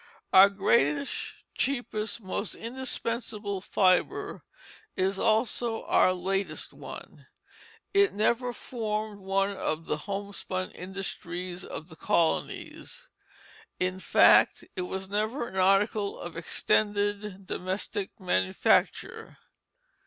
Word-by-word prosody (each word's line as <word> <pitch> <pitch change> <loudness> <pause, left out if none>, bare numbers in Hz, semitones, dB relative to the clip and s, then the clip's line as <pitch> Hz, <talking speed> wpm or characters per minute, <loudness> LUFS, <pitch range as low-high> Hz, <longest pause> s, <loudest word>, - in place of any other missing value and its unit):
Our 190 +1 +9
greatest, 190 - +2 0.4
cheapest, 230 -5 -1
most 195 +1 -3
indispensable 230 -4 -3
fibre 185 -1 +1 0.6
is 190 +1 +1
also 225 +1 +1
our - - +4
latest 190 +2 -2
one. - - -10 0.7
It 400 -1 +5
never 235 +4 +1
formed 215 -4 -4
one 195 +1 +1
of 160 -3 -2
the 150 - -1
homespun 195 +1 -4
industries 180 -1 -5
of 155 - -7
the 160 - -12
colonies; 170 - -1 0.7
in 185 0 -1
fact, - - +5
it 185 - -2
was 190 0 -4
never 215 +5 -1
an 190 - -8
article 200 +2 +2
of 175 - -7
extended 205 +3 0
domestic 190 +2 -3
manufacture. 95 - +1
195 Hz, 100 wpm, -28 LUFS, 185-215 Hz, 0.7 s, Our